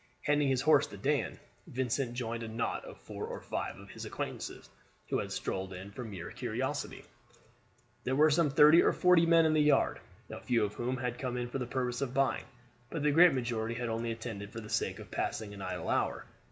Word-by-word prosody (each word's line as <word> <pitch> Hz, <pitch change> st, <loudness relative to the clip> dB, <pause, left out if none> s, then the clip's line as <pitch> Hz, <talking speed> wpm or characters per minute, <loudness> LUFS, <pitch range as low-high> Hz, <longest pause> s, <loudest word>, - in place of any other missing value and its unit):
Handing 145 Hz, -1 st, +2 dB
his 130 Hz, -2 st, +2 dB
horse 150 Hz, -2 st, +5 dB
to 100 Hz, -, -10 dB
Dan, 135 Hz, -, 0 dB, 0.3 s
Vincent 125 Hz, 0 st, -1 dB
joined 115 Hz, -1 st, -3 dB
a 115 Hz, -, -4 dB
knot 115 Hz, +1 st, -2 dB
of -, -, -10 dB
four -, -, -7 dB
or -, -, -5 dB
five -, -, -4 dB
of -, -, -12 dB
his -, -, -8 dB
acquaintances -, -, -5 dB, 0.4 s
who -, -, +1 dB
had -, -, -4 dB
strolled 95 Hz, 0 st, -3 dB
in 95 Hz, +2 st, -8 dB
from 115 Hz, +2 st, -7 dB
mere 95 Hz, -4 st, -7 dB
curiosity. -, -, -3 dB, 1.0 s
There 130 Hz, -, 0 dB
were 155 Hz, +2 st, +5 dB
some 155 Hz, 0 st, +3 dB
thirty 150 Hz, +4 st, +7 dB
or -, -, +3 dB
forty 180 Hz, -2 st, +5 dB
men 165 Hz, -1 st, +6 dB
in 155 Hz, -, +3 dB
the 155 Hz, -, +4 dB
yard, 150 Hz, 0 st, +3 dB, 0.3 s
a -, -, -7 dB
few 115 Hz, -3 st, +2 dB
of 105 Hz, -, -5 dB
whom 125 Hz, +4 st, -2 dB
had 125 Hz, -1 st, -3 dB
come 125 Hz, -2 st, -2 dB
in 120 Hz, 0 st, -3 dB
for 135 Hz, -, -2 dB
the 125 Hz, -, -3 dB
purpose 125 Hz, -1 st, -2 dB
of 130 Hz, -2 st, -2 dB
buying; 135 Hz, 0 st, +1 dB, 0.4 s
but 160 Hz, -3 st, -3 dB
the 150 Hz, -, +4 dB
great 170 Hz, +2 st, +7 dB
majority 115 Hz, -2 st, -2 dB
had 120 Hz, 0 st, -3 dB
only 115 Hz, +1 st, -2 dB
attended 110 Hz, -3 st, -6 dB
for 115 Hz, -, -6 dB
the 105 Hz, -1 st, -9 dB
sake 110 Hz, -, -1 dB
of -, -, -11 dB
passing 105 Hz, -2 st, -3 dB
an 100 Hz, -, -9 dB
idle -, -, -4 dB
hour. -, -, 0 dB
125 Hz, 220 wpm, -32 LUFS, 115-145 Hz, 1.0 s, thirty